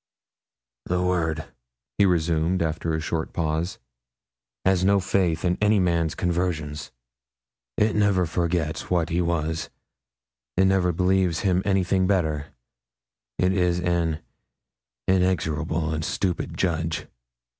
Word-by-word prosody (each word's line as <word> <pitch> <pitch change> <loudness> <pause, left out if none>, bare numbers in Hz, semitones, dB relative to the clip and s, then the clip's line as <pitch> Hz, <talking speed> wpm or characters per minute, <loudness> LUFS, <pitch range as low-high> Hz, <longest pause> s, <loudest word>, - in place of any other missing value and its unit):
'The 90 0 0
world,' 85 -3 0 0.6
he 100 - +6
resumed 85 0 +1
after 80 0 -1
a - - -1
short 80 +1 -3
pause, 80 +2 -1 0.9
'has 95 -1 +3
no 100 +1 +4
faith 90 -3 0
in 90 0 +1
any 105 0 +4
man's 85 -3 +1
conversion; 85 -4 -1 1.0
it 105 +1 +2
never 100 -3 +3
forgets 85 -1 -1
what 85 -2 +1
he 85 +1 +1
was, 80 -2 -1 0.9
it 95 - +5
never 95 -2 +3
believes 90 -1 +1
him 95 -2 +2
anything 95 -1 +2
better, 80 -7 0 0.9
it 90 +1 +2
is 90 -2 +1
an 85 -3 0 0.9
inexorable 80 -4 +1
and 80 0 -2
stupid 90 +2 -2
judge. 80 -2 -1
85 Hz, 115 wpm, -25 LUFS, 80-95 Hz, 1.0 s, he